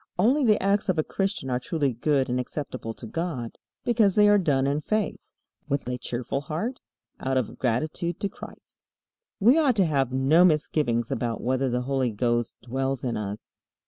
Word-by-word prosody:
Only 250 +10 +3
the 215 -4 +4
acts 200 +1 +1
of 180 - +2
a 155 - +2
Christian 195 -9 -2
are 125 - +1
truly 140 0 -1
good 135 +3 +1
and 125 +1 -1
acceptable 125 -3 -5
to - - -9
God, 130 -3 -4 0.2
because 220 -5 +3
they 210 0 +6
are 205 0 +6
done 140 -7 +2
in 140 +2 +1
faith, 215 +5 -2 0.4
with 140 -2 -1
a 125 0 -3
cheerful 125 +3 -3
heart, 175 - -4 0.4
out 130 0 0
of 130 - -2
gratitude 155 +8 -1
to 200 - +1
Christ. 195 - -12 0.6
We 240 +10 +5
ought 275 -6 +3
to 195 -3 +4
have 135 -5 +1
no 135 +6 +4
misgivings 150 -8 +1
about 115 -2 -2
whether 130 +1 +1
the 125 0 0
Holy 135 -1 0
Ghost 120 +2 0
dwells 135 +1 -2
in 125 -2 -1
us. 105 0 -6
140 Hz, 180 wpm, -26 LUFS, 125-185 Hz, 0.6 s, they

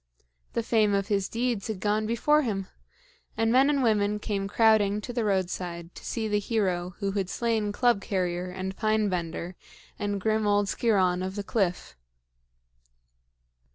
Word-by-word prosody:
The 230 - -1
fame 215 -3 +2
of 195 0 -1
his 195 -2 0
deeds 235 -3 -1
had 215 -4 -4
gone 210 +2 0
before 295 +7 +3
him, 200 -8 -2 0.7
and 225 0 +2
men 265 +3 +5
and 280 -2 +2
women 210 -2 +2
came 200 -2 -3
crowding 210 -1 +3
to 245 +4 -7
the 235 -1 0
roadside 180 -3 -2
to - - -12
see 225 -2 -2
the 210 -1 +1
hero 185 -5 -1
who 200 -1 -2
had 195 -2 -2
slain 225 -3 0
Club 240 -1 +2
carrier 180 -2 -2
and 190 +1 -5
Pine 215 -1 +1
bender 175 0 -4 0.4
and 205 -1 -1
grim 215 +1 +1
old 205 0 +3
Sciron 190 -6 +2
of 190 +1 -4
the 205 - -3
cliff. 195 -4 -1
205 Hz, 160 wpm, -27 LUFS, 190-220 Hz, 0.7 s, men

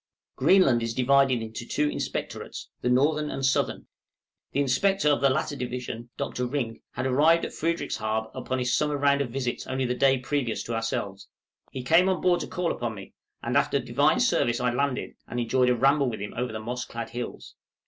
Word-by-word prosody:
Greenland 135 -12 +4
is 115 0 -3
divided 130 -2 +3
into 110 +2 -6
two 150 +5 0
inspectorates, - - -5
the 125 - 0
northern 150 +4 +2
and 135 -1 -2
southern; 135 - 0 0.7
the - - -1
inspector 150 +6 +2
of 145 - +2
the 140 - +5
latter 140 +2 -1
division, 125 -2 -5
Dr. 125 0 -2
Rink, 120 -4 -3
had 130 - -3
arrived 155 +6 +4
at - - -7
Frederickshaab 110 -9 -2
upon 130 - -3
his 125 -1 +1
summer 150 -1 +1
round 140 0 +3
of 135 - -2
visits 125 0 -3
only 130 0 -1
the 125 - 0
day 135 +1 +3
previous 125 -2 -2
to 115 - -5
ourselves. 100 -3 -3 0.4
He 130 - -5
came 170 +7 +4
on 185 - +1
board 180 -1 +3
to - - -4
call 180 -1 -1
upon 120 -2 -3
me, 95 -1 -11 0.3
and - - -2
after - - +3
Divine - - +2
service 120 +1 +2
I 125 -1 +1
landed, 140 0 -1
and 120 - -4
enjoyed 125 +2 +2
a 125 - +3
ramble 135 +2 +3
with 110 - -5
him 105 +1 -6
over 125 0 -2
the 110 - -5
moss 120 +3 -4
clad 115 -2 -6
hills. 120 0 -6
130 Hz, 200 wpm, -26 LUFS, 120-140 Hz, 0.7 s, the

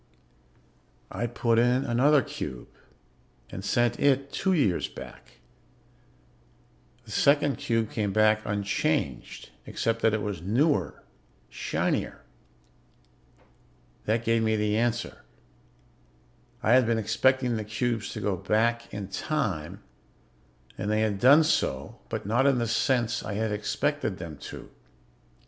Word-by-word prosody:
"I 120 - -2
put 115 -1 +1
in 125 +2 +3
another 135 +4 +3
cube 75 - -7 0.8
and 95 - -7
sent 120 +3 +1
it 140 0 +2
two 190 - 0
years 120 - +1
back. - - -12 1.7
The - - -12
second 145 -2 +3
cube 115 -2 -1
came 105 -3 -1
back 110 +1 +3
unchanged, 100 -10 -2 0.2
except 115 0 -1
that 110 -1 +3
it 105 - -3
was 100 -5 -4
newer, 105 - 0 0.5
shinier. - - -2 1.8
"That 110 +2 0
gave 115 0 +2
me 110 0 +1
the 105 0 0
answer. 120 +1 -1 1.4
I 110 - +2
had 130 -2 +5
been 115 -1 +2
expecting 120 +3 +1
the 110 - -3
cubes 110 +1 -2
to - - -5
go 100 -2 0
back 115 +5 0
in 100 -2 -5
time, 100 - -3 1.0
and 105 - -2
they 110 0 +1
had 105 -3 0
done 140 +8 +7
so, 70 - -1
but - - -4
not 120 +7 +2
in 135 -2 +3
the 120 - 0
sense 115 0 0
I 105 - -4
had 110 +1 -1
expected 105 +2 -1
them 80 -4 -8
to. - - -10
115 Hz, 125 wpm, -27 LUFS, 105-125 Hz, 1.8 s, done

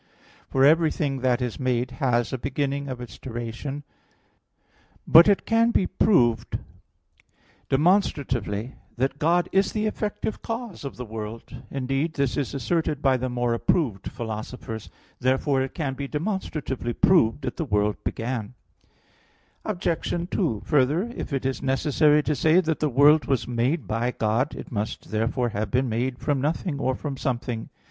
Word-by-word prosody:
For 135 0 +4
everything 155 -3 +3
that 125 -1 +1
is 120 -3 -4
made 125 -1 0
has 120 -3 +1
a 130 - -2
beginning 140 +1 -2
of 130 -2 -5
its 120 -5 -9
duration. 120 +4 -5 1.2
But 165 +4 +8
it 200 -1 +3
can 230 +1 +3
be 200 - +2
proved 120 - +2 1.1
demonstratively 135 - +1 0.2
that 135 +3 -1
God 170 +3 +3
is 195 +1 +2
the 215 0 0
effective 215 0 -3
cause 230 -5 -5
of 140 - -6
the 125 - -5
world; 110 +2 -7
indeed 135 +4 -1
this 140 -5 0
is 140 0 -2
asserted 150 +2 -1
by 135 -2 +4
the 130 0 -2
more 120 -1 0
approved 115 - 0
philosophers. 110 0 -6 0.3
Therefore 130 +2 +2
it 130 - -4
can 145 -6 -2
be 140 +1 -5
demonstratively 150 - -3
proved 145 -6 +3
that 125 - -4
the - - -1
world 105 -3 0
began. 115 -1 -3 1.1
Obj. 175 -6 -1 0.2
2: 115 - 0
Further, 150 - +2
if - - -5
it 135 -2 -2
is 135 0 -1
necessary 150 +2 +3
to 150 - 0
say 160 +4 +4
that 160 -3 0
the 155 - +1
world 145 +4 +5
was 135 -5 0
made 125 - 0
by 115 +4 0
God, 120 +5 0
it - - -9
must 105 -1 -4
therefore 115 +3 0
have 105 -1 -3
been 125 +3 +1
made 120 +3 -1
from 140 -1 -1
nothing 150 +1 -1
or 130 -1 0
from 140 -1 -5
something. 120 -3 -3
135 Hz, 155 wpm, -25 LUFS, 120-150 Hz, 1.2 s, But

